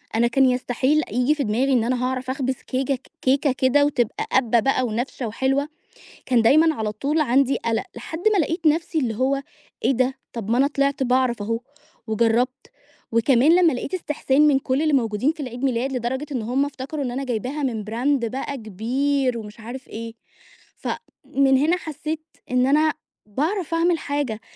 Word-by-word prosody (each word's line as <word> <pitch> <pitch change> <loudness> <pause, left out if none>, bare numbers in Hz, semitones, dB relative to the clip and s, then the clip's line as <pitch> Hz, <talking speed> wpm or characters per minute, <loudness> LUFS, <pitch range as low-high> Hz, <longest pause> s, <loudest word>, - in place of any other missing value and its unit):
أنا 235 +1 +3
كان 270 +3 +3
يستحيل 255 +4 +1
ييجي 250 +6 +2
في 285 - -1
دماغي 250 +6 +1
إن 235 -3 +3
أنا 250 +1 0
هاعرف 255 0 -3
أخبز 260 -1 -1
كيكة 260 0 -1 0.2
كيكة 275 +2 +2
كده 265 +3 +3
وتبقى 245 -6 -1
قابّة 240 -3 +3
بقى 255 +2 +1
ونافشة 240 +2 -3
وحلوة. 270 +6 0 0.6
كان 245 -3 +3
دايمًا 310 +7 +5
على 215 -3 -2
طول 290 +8 -1
عندي 275 0 +3
قلق، 225 -1 -1
لحد 320 +7 -6
ما 400 - +2
لقيت 330 +1 0
نفْسي 325 +1 +2
اللي 230 -6 -1
هو 275 +2 +1 0.4
إيه - - +4
ده؟ 255 +1 +1 0.2
طب 225 -2 -5
ما 240 - +3
أنا 275 - +5
طلعت 280 -1 0
باعرف 250 -3 +1
أهو، 230 +2 -2 0.5
وجربت. 230 +3 +1 0.5
وكمان 255 +7 +4
لما 345 -4 +5
لقيت 255 +7 -4
استحسان 300 -4 +1
من 270 -2 +4
كل 265 +2 -1
اللي 310 -1 +2
موجودين 230 +3 +1
في 320 - -12
العيد 250 0 -5
ميلاد 260 +1 0
لدرجة 260 +4 -2
إن 250 - -2
هم 255 +5 +1
افتكروا 280 +1 -5
إن 245 - -2
أنا 270 +3 -3
جايباها 255 +5 -3
من 225 -6 -2
brand 240 +3 0
بقى 270 +2 -4
كبير، 250 +5 -1
ومش 210 0 -10
عارف 250 +4 -8
إيه. 230 +1 -7 0.6
ف - - -6 0.4
من 270 -1 +3
هنا 320 +6 +3
حسيت 310 -1 -5 0.3
إن 250 0 +3
أنا 305 +3 +3 0.3
باعرف 330 - -2
أعمل 335 0 +2
حاجة. 285 -8 -2
260 Hz, 180 wpm, -23 LUFS, 235-285 Hz, 0.6 s, دايمًا